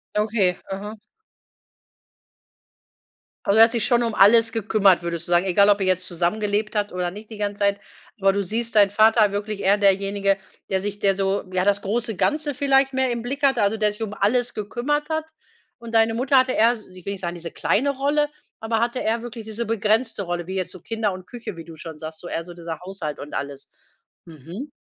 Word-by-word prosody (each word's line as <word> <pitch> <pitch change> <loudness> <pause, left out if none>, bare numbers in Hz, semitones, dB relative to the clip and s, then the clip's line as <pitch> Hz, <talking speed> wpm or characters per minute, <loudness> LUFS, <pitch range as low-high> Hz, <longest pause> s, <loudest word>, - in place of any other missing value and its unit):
Okay, 210 -4 +2
mhm. 205 +3 -6 2.5
Also 200 - +3
er 225 - +10
hat 225 - -3
sich 235 -2 +1
schon 240 -1 +3
alles 225 +3 +6
gekümmert, 205 -4 +3
würdest 170 -1 -4
du - - -5
sagen? 175 +2 +4
Egal, 200 +2 +4
ob 205 0 +4
er 190 - +1
jetzt 185 0 +1
zusammengelebt 205 +5 -1
habt 205 -1 0
oder 180 -1 -2
nicht 210 +4 -11
die 220 - -8
ganze 205 -1 -3
Zeit, 200 0 +2 0.4
aber 195 0 +3
du 200 0 0
siehst 225 +4 -3
deinen 200 -2 +5
Vater 215 0 +4
wirklich 205 0 -4
eher 200 +1 +3
derjenige, 195 0 +2 0.3
der 190 - +1
sich 205 +1 -4
der 195 -1 +2
so 195 +1 0
ja 185 0 0
das 205 0 +2
große 225 +2 -2
Ganze 295 +8 0
vielleicht 270 0 +2
mehr 260 -1 +1
im 235 -1 -3
Blick 275 +4 -4
hatte, 270 -6 +3
also 205 +2 +1
der 210 -1 +2
sich 215 +2 -5 0.2
alles 245 +4 +1
gekümmert 270 +8 -2
hat. 315 0 -1 0.5
Und 230 -1 -7
deine 225 0 +4
Mutter 260 +4 +2
hatte 255 0 +4
eher 235 0 +3 0.2
ich 185 -1 -13
will 200 - -2
nicht 195 - -7
sagen, 175 -1 -3
diese 170 -1 -7
kleine 270 +7 +1
Rolle, 295 +2 +1 0.3
aber 225 0 -1
hatte 240 +2 0
eher 225 +1 -1
wirklich 235 -2 -8
diese 220 +2 -4
begrenzte 225 +1 0
Rolle, 175 -2 -3
wie 190 +2 -6
jetzt 185 -2 -2
so 185 - -10
Kinder 220 +2 -2
und 185 -1 -8
Küche, 230 -4 -8
wie 165 - -9
du 165 - -11
schon 160 0 -9
sagst, 160 0 -8
so 175 - -9
eher 165 - -3
so 175 +1 -11
dieser 165 -2 -7
Haushalt 180 -5 -6
und 145 - -9
alles. 140 -1 -6 0.5
Mhm. 170 - -9
205 Hz, 210 wpm, -23 LUFS, 185-230 Hz, 2.5 s, er